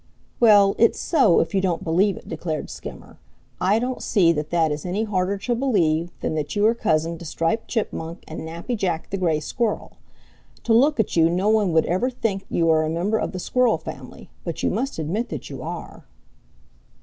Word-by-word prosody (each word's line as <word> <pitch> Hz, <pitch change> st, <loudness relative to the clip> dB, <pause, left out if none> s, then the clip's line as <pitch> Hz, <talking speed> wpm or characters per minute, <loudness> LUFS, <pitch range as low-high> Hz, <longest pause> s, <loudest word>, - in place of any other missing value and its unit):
"Well, 205 Hz, -4 st, +6 dB
it's 230 Hz, -, +4 dB
so, 275 Hz, -, +4 dB
if 165 Hz, -, -3 dB
you 195 Hz, -, +2 dB
don't 175 Hz, -3 st, -1 dB
believe 185 Hz, +4 st, +2 dB
it," -, -, -13 dB
declared 160 Hz, -1 st, -4 dB
Skimmer. -, -, -10 dB, 0.4 s
"I 195 Hz, +4 st, +3 dB
don't 250 Hz, +2 st, -2 dB
see 180 Hz, -6 st, +3 dB
that 150 Hz, -2 st, -2 dB
that 165 Hz, -3 st, +2 dB
is 150 Hz, 0 st, -3 dB
any 190 Hz, +5 st, -1 dB
harder 200 Hz, -2 st, -1 dB
to 240 Hz, +5 st, -2 dB
believe 175 Hz, -, +1 dB
than -, -, -1 dB
that 155 Hz, +3 st, -3 dB
you 205 Hz, 0 st, +2 dB
are 225 Hz, -, +5 dB
cousin 165 Hz, -7 st, 0 dB
to -, -, -9 dB
Striped 165 Hz, +6 st, -1 dB
Chipmunk 170 Hz, -7 st, -4 dB
and 160 Hz, -, -7 dB
Nappy 170 Hz, +9 st, -4 dB
Jack 175 Hz, -6 st, -2 dB
the 195 Hz, -, -1 dB
Gray 165 Hz, -5 st, +1 dB
Squirrel. 225 Hz, -, -3 dB, 0.7 s
To 230 Hz, -, +2 dB
look 275 Hz, +4 st, +4 dB
at 220 Hz, -, 0 dB
you 165 Hz, -1 st, +5 dB
no 185 Hz, +5 st, +1 dB
one 215 Hz, -4 st, +3 dB
would 160 Hz, -, +4 dB
ever 185 Hz, +9 st, 0 dB
think 210 Hz, -6 st, -3 dB
you 165 Hz, -, +1 dB
are 160 Hz, 0 st, +4 dB
a 155 Hz, -, -1 dB
member 185 Hz, +7 st, 0 dB
of -, -, -2 dB
the 185 Hz, -, -6 dB
Squirrel 250 Hz, +5 st, +2 dB
family, -, -, -10 dB
but -, -, -5 dB
you -, -, +2 dB
must 275 Hz, +1 st, -2 dB
admit 175 Hz, +10 st, -2 dB
that -, -, -6 dB
you -, -, -7 dB
are." -, -, -7 dB
185 Hz, 205 wpm, -23 LUFS, 165-220 Hz, 0.7 s, Well